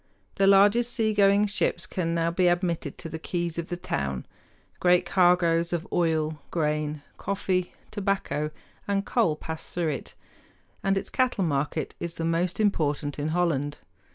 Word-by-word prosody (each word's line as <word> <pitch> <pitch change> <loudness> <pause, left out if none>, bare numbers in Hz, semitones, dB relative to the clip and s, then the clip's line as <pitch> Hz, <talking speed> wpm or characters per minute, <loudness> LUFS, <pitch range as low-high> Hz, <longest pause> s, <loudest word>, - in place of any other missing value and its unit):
The 195 -1 +4
largest 205 +5 +5
seagoing 210 -3 +3
ships 205 0 0
can 170 -3 -2
now 165 0 +1
be 180 +1 +2
admitted 175 -4 0
to 165 - -6
the 160 0 -6
quays 170 0 -2
of 170 - -4
the 175 - -4
town. 70 - -3 0.5
Great 180 0 +4
cargoes 175 -2 +3
of 170 -1 -2
oil, 160 -3 +1
grain, 150 -2 -1
coffee, 185 -2 -1 0.2
tobacco, 195 -7 -1 0.4
and 200 0 0
coal 215 -11 +2
pass 160 +1 -6
through 170 -2 0
it, 140 - -5 0.7
and 195 0 +2
its - - -4
cattle 255 -6 +1
market 150 0 -1
is 170 -1 -5
the 165 - -3
most 170 +3 0
important 150 -8 0
in 145 - -1
Holland. 155 -4 0
170 Hz, 155 wpm, -27 LUFS, 155-195 Hz, 0.7 s, largest